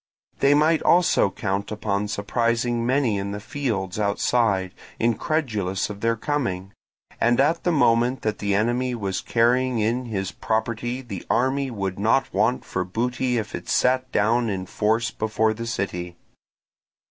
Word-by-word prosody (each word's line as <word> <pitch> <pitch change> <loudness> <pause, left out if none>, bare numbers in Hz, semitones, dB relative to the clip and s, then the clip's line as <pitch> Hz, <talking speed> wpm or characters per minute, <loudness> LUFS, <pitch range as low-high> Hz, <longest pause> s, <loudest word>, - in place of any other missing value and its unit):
They 140 +1 +5
might 155 +2 +3
also 175 - +4
count 100 +1 -3
upon 105 -1 -1
surprising 115 +3 0
many 125 -6 +2
in 100 +1 -4
the 105 - -4
fields 105 -7 -3
outside, 100 -2 +1 0.3
incredulous 115 - 0
of 100 0 -9
their 115 0 +2
coming; 110 -8 -2 0.5
and 120 +2 +3
at 160 +5 +2
the 175 - +2
moment 125 -3 +2
that 110 -1 -1
the 100 -1 0
enemy 120 +4 0
was 100 -4 -3
carrying 125 +2 +2
in 115 +4 0
his 95 -5 -3
property 115 +3 -2
the 100 -7 -7
army 135 +2 +1
would 95 -5 -4
not 115 +6 +2
want 125 - +1
for 90 - -2
booty 125 +6 -1
if 110 -2 -4
it - - -6
sat 130 0 +2
down 115 +3 +2
in 95 -2 -3
force 110 +5 0
before 110 0 0
the 115 +1 -6
city. 90 -5 -3
115 Hz, 150 wpm, -24 LUFS, 100-125 Hz, 0.5 s, They